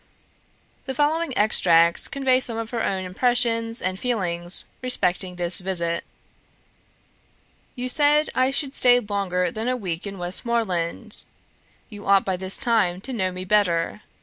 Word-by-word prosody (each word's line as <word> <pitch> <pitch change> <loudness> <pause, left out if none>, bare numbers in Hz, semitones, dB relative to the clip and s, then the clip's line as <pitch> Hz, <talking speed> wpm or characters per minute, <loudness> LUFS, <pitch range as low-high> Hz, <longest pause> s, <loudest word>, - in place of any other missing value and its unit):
The 265 - -4
following 305 +2 0
extracts 170 -5 +4
convey 265 -2 +1
some 235 -3 -4
of 225 0 -5
her 235 -2 -2
own 190 -1 -1
impressions 230 +3 0
and 185 +1 -2
feelings 180 -7 +1 0.2
respecting 185 -7 -1
this 175 0 +1
visit: 170 -3 -1 1.7
"You 250 -1 -3
said 295 +3 +2
I 255 0 +2
should 275 0 0
stay 245 -2 +5
longer 195 -5 -2
than 220 +5 -4
a 255 0 0
week 180 -4 -4
in 200 0 -6
Westmoreland; 190 +1 -1 0.7
you 205 -1 -10
ought 195 -1 +4
by 190 - -1
this 190 +1 0
time 205 -7 +1
to 265 - -6
know 190 -5 -1
me 185 0 -7
better. 185 -2 +1
205 Hz, 145 wpm, -23 LUFS, 180-245 Hz, 1.7 s, stay